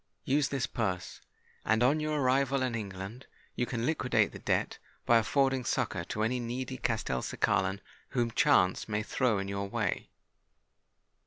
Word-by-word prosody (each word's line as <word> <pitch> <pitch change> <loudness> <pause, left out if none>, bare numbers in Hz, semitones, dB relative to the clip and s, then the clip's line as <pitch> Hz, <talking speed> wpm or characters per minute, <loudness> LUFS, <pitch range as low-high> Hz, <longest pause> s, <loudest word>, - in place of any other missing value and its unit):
Use 140 +1 +2
this 135 -3 -1
purse; 95 -6 -3 0.4
and, 110 +2 +2
on 140 +5 +4
your 155 -1 -1
arrival 135 +1 +2
in 125 -2 -1
England, 100 +2 -6 0.3
you 125 - 0
can 115 0 -2
liquidate 130 -4 +2
the - - -9
debt - - -1 0.3
by 115 -1 +6
affording 135 +2 +1
succour 115 -8 -1
to 110 +4 -2
any 125 +3 0
needy 125 +2 -4
Castelcicalan 95 - 0 0.3
whom 120 -2 0
chance 110 -8 +3
may 105 0 0
throw 120 -1 +1
in 100 0 -3
your 100 0 -3
way." - - -2
120 Hz, 150 wpm, -30 LUFS, 100-130 Hz, 0.4 s, by